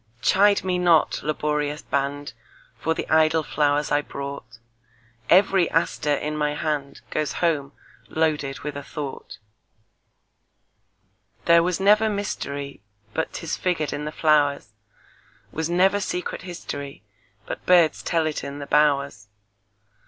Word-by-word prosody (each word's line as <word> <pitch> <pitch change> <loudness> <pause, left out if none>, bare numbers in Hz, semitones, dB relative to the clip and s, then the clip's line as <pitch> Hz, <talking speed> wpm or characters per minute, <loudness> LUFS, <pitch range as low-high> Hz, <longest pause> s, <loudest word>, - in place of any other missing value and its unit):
Chide 200 +1 +4
me 180 -1 0
not, 170 -3 +3
laborious 150 0 -2
band, 140 0 -2 0.5
For 160 - 0
the - - -4
idle 160 0 +3
flowers 145 0 0
I 145 - +3
brought; 140 -5 -8 0.7
Every 190 -1 +4
aster 150 -3 +1
in 150 +2 -3
my 150 -1 -1
handGoes 150 0 -3
home 150 -5 0 0.3
loaded 150 -4 -1
with 150 -1 -5
a 145 - -5
thought. 140 -5 -7 2.1
There 170 0 +6
was 180 +1 -1
never 210 +3 +4
mysteryBut 140 - -5
'tis 165 - -4
figured 170 -5 -1
in 150 - -4
the 150 - -4
flowers; 145 -6 +2 0.8
SWas 160 +1 -2
never 190 +3 +3
secret 180 -2 -4
historyBut 115 - -9
birds 175 -3 +4
tell 165 -2 0
it 155 -1 -3
in 140 0 -6
the 145 - -6
bowers. 140 -5 +1
150 Hz, 120 wpm, -24 LUFS, 140-170 Hz, 2.1 s, There